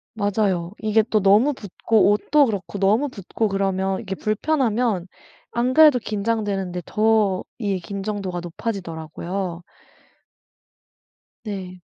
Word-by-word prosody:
맞아요 200 -5 0
이게 215 0 +3
또 215 -3 +2
너무 210 +9 +5
붙고 215 -1 +1
옷도 285 +8 +3
그렇고 200 -6 -4
너무 215 +9 +2
붙고 215 0 -3
그러면 195 -1 0
이게 195 -4 -5
불편하면 220 - 0 0.4
안 245 +2 0
그래도 300 -3 +7
긴장되는데 205 -4 -2
더 215 -3 +2 0.2
이 200 -3 0
긴장도가 195 -1 -4
높아지더라고요. 175 -1 -5 1.8
네. 190 -4 -6
205 Hz, 255 characters per minute, -22 LUFS, 190-225 Hz, 1.8 s, 그래도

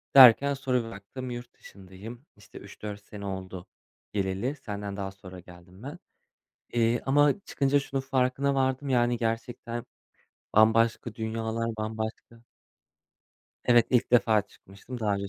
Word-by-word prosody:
Derken 135 +2 +9
sonra 130 -3 0
bir - - -7
baktım 120 +6 -8
yurt 120 0 -7
dışındayım. 100 +7 -12
İşte 105 -2 -15
3-4 100 0 -8
sene 100 -1 -9
oldu 95 -2 -6 0.5
geleli. 100 +7 -1
Senden 100 -5 -6
daha 95 -1 -4
sonra 95 -2 -11
geldim 90 +3 -15
ben. 145 - -7 0.7
Eee, 115 0 +2
ama 145 +6 +4
çıkınca 140 -5 +1
şunun 135 0 -3
farkına 135 +1 +1
vardım. 130 +1 0
Yani 120 -1 +2
gerçekten 115 +1 -3 0.7
bambaşka 110 +1 +3
dünyalar, 110 0 -2
bambaşka 110 +1 -5 1.2
Evet 120 -2 +5
ilk 125 -1 +2
defa 110 -4 +4
çıkmıştım. 105 +5 -11
Daha 105 -2 +1
önce 100 0 -4
115 Hz, 130 wpm, -28 LUFS, 100-130 Hz, 1.2 s, Derken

